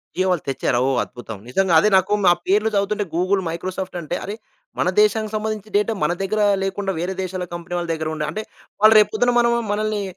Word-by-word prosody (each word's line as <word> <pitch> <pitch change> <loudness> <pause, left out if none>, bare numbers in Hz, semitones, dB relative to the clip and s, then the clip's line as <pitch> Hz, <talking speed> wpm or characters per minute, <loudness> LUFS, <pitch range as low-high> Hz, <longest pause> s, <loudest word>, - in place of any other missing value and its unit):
జియో 185 +1 +1
వాళ్ళు 175 -4 -1
తెచ్చారా? 130 -2 0
ఓహ్! 135 -2 +1
అద్భుతం! 115 -3 -9
నిజంగా 190 +6 +1
అదే 210 - +3
నాకు 190 +3 +1
ఆ - - +6
పేర్లు 210 +3 +3
చదువుతుంటే 205 +1 0
గూగుల్, 185 +3 +1
మైక్రోసాఫ్ట్ 185 +2 -5
అంటే 170 +2 -3
అరే! 205 - -5 0.4
మన - - +2
దేశానికి 220 - +1
సంబంధించి 215 -1 -4
డేటా 210 +2 +1
మన 175 - +2
దగ్గర 210 +3 -1 0.2
లేకుండా 195 0 -2
వేరే 180 +3 -3
దేశాల 185 0 -4
కంపెనీ 170 +1 -5
వాళ్ళ 170 -1 -3
దగ్గర 160 -1 -3
ఉండ 155 - -3
అంటే 215 +7 -4 0.4
వాళ్ళు 215 +1 +8
రేపు 210 - +3
పొద్దున 245 +3 +2
మనం 235 0 +3 0.2
మనల్ని 215 0 -1
195 Hz, 200 wpm, -21 LUFS, 175-215 Hz, 0.4 s, వాళ్ళు